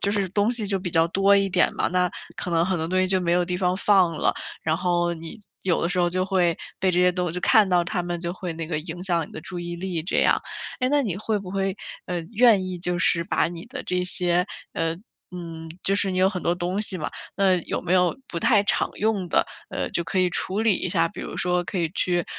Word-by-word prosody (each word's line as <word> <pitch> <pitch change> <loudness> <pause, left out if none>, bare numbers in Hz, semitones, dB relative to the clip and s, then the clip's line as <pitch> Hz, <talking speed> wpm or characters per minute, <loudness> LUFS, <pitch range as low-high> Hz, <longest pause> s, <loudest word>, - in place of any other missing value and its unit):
就 200 - 0
是 200 -2 0
东 205 +3 +2
西 235 -4 +2
就 195 -1 +1
比 180 -1 -4
较 165 0 +3
多 195 +3 +4
一 195 0 +2
点 180 -1 +2
嘛。 - - 0
那 180 0 +1 0.3
可 180 - -4
能 165 0 +3
很 185 0 0
多 160 -1 -2
东 185 +1 +1
西 185 - +2
就 185 0 +2
没 170 -1 0
有 175 0 +3
地 180 0 -2
方 180 -1 +1
放 190 -4 +4
了。 - - +1 0.3
然 160 0 +1
后 175 -1 +1
你， 165 +5 -9 0.2
有 180 -3 +1
的 170 - +1
时 180 +1 -1
候 175 0 +2
就 185 +1 0
会 180 -3 +1 0.2
被 190 0 +3
这 180 - +1
些 180 0 +4
东 180 0 -1
西 - - -4
就 180 - -2
看 210 +2 +5
到 175 -2 +3
它 180 +1 -2
们， 175 -1 -4
就 170 0 -3
会 180 -1 -5
那 165 0 -5
个 155 -2 -2
影 170 +2 -7
响 170 -4 0
你 - - -17
的 - - -7
注 180 +2 -7
意 175 0 -5
力， 175 -2 -3
这 175 - 0
样。 - - +3 0.4
诶， 255 - +2
那 290 +1 +3
你 200 -9 -2
会 215 +1 -1
不 195 -2 -8
会， 195 0 -1 0.3
呃， 180 -1 -2
愿 225 -4 +5
意 185 -1 -4
就 180 0 -1
是 170 -2 +2
把 185 - +1
你 170 +1 -7
的 255 +1 -7
这 180 0 0
些 180 0 +1 0.3
呃， 165 0 -1 0.4
嗯， 165 -2 -7
就 195 - +2
是 200 -1 +2
你 185 - -2
有 185 +1 +5
很 185 -3 -4
多 170 - +1
东 180 +3 -2
西 205 -3 +2
嘛， 155 - -3 0.3
那 195 -2 +4
有 - - -2
没 180 - -1
有 180 -2 +3
不 170 - -5
太 210 0 +4
常 - - +1
用 205 -4 0
的， - - +2 0.2
呃， - - -3
就 170 - -1
可 180 +3 -2
以 185 -1 +3
处 190 +4 -1
理 220 -2 +4
一 - - -3
下， 165 -3 +2
比 - - -9
如 - - -6
说 180 0 +1
可 175 +3 -4
以 170 -2 +1
去， 175 -3 +1
180 Hz, 285 characters per minute, -24 LUFS, 175-195 Hz, 0.4 s, 看